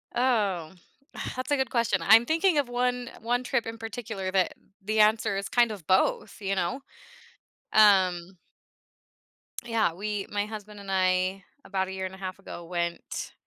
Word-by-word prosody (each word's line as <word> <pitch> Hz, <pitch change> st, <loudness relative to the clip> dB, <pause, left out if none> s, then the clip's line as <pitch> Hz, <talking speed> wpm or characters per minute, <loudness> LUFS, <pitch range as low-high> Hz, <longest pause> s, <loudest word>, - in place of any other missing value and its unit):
Oh, 205 Hz, -10 st, +1 dB, 0.6 s
that's 255 Hz, +3 st, -4 dB
a -, -, +5 dB
good 265 Hz, -2 st, 0 dB
question. 230 Hz, -5 st, +1 dB
I'm 220 Hz, +7 st, +7 dB
thinking 325 Hz, +3 st, +2 dB
of 280 Hz, -4 st, +1 dB
one 245 Hz, 0 st, -1 dB
one 245 Hz, +2 st, 0 dB
trip 250 Hz, -1 st, 0 dB
in 225 Hz, -, -5 dB
particular 225 Hz, -4 st, -5 dB
that 185 Hz, -1 st, +2 dB, 0.3 s
the 215 Hz, +2 st, 0 dB
answer 215 Hz, -2 st, +3 dB
is 195 Hz, -, -4 dB
kind 240 Hz, -2 st, +3 dB
of 190 Hz, -7 st, -9 dB
both, 190 Hz, +2 st, +1 dB
you 195 Hz, 0 st, -1 dB
know, 180 Hz, +8 st, -1 dB, 0.9 s
um 185 Hz, -4 st, +4 dB, 1.3 s
Yeah, 225 Hz, -7 st, +1 dB
we 205 Hz, +2 st, -3 dB
my 205 Hz, 0 st, 0 dB
husband 210 Hz, -1 st, -9 dB
and 200 Hz, -1 st, -10 dB
I, 185 Hz, 0 st, +1 dB, 0.2 s
about 190 Hz, -1 st, -1 dB
a -, -, -6 dB
year 190 Hz, 0 st, -4 dB
and 185 Hz, 0 st, -6 dB
a -, -, -14 dB
half 185 Hz, 0 st, -6 dB
ago, 175 Hz, -3 st, -9 dB
went 170 Hz, 0 st, -4 dB
205 Hz, 165 wpm, -27 LUFS, 190-235 Hz, 1.3 s, I'm